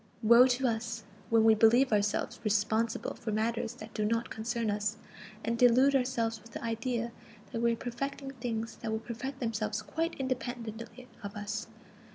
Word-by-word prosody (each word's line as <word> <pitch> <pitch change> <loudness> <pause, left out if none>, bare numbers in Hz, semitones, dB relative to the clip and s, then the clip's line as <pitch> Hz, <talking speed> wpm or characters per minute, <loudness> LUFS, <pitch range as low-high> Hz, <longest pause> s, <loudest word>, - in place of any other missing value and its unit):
Woe 235 +3 +8
to 255 +1 +1
us, 230 -1 -2 0.3
when 225 -1 +5
we 220 0 +7
believe 230 +3 +5
ourselves 205 0 0
responsible 215 +1 +1
for 225 - -5
matters 225 +1 -1
that 215 0 -10
do 215 - -1
not 230 +2 0
concern 230 0 -1
us, 210 +1 -1 0.5
and 230 0 -1
delude 255 +3 +6
ourselves 235 -4 0
with 230 - -16
the - - -6
idea 230 +1 -2 0.4
that 230 -3 -2
we 235 0 +3
are - - -1
perfecting 270 +4 -4
things 230 -3 -4
that 220 - -4
will 220 - 0
perfect 240 +4 -6
themselves 215 -3 -2
quite 330 +1 -2
independently 245 -2 -4
of 200 -1 -7
us! 210 +1 -4
230 Hz, 170 wpm, -31 LUFS, 220-245 Hz, 0.5 s, Woe